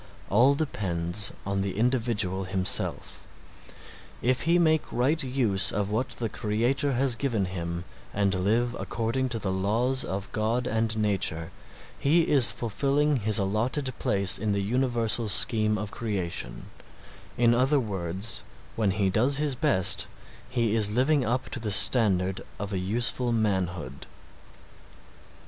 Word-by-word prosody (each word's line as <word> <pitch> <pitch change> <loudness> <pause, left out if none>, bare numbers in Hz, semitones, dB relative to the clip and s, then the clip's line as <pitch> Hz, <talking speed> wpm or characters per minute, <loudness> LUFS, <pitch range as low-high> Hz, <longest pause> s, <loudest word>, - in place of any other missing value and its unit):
All 125 +8 +4
depends 95 - +2 0.2
upon 100 0 -2
the 95 0 -4
individual 110 -6 0
himself. 95 0 +1 1.0
If 130 +1 +1
he 170 - +4
make 160 -3 +1
right 140 +7 0
use 120 -7 +2
of 100 0 -2
what 120 +5 -1
the 115 - -2
Creator 120 +6 -1
has 130 0 +1
given 115 -6 -1
him 85 -2 -5 0.3
and 100 -1 0
live 110 +6 0
according 120 +3 -2
to 120 - -3
the 100 -3 -3
laws 115 +7 0
of 95 +1 -5
God 115 +3 -1
and 110 -1 -1
nature 95 -6 -1 0.5
he 160 +5 +3
is 140 -6 +4
fulfilling 140 +6 0
his 110 -1 +1
allotted 115 +7 -1
place 100 0 +1
in 105 0 -1
the 100 0 -1
universal 120 0 0
scheme 110 +1 +3
of 105 0 -5
creation, 100 -7 -4 0.7
in 120 0 +4
other 135 +4 +2
words, 95 -2 -3 0.3
when 110 -3 0
he 95 0 0
does 130 +8 +3
his 150 -1 0
best, 95 -6 +1 0.4
he 120 -4 0
is 105 -2 +3
living 135 +3 +2
up 125 +2 -2
to 135 - -4
the 110 -2 -4
standard 95 -4 +5 0.2
of 100 0 -5
a 95 - -1
useful 120 +5 -1
manhood. 95 - -2
110 Hz, 140 wpm, -26 LUFS, 100-125 Hz, 1.0 s, standard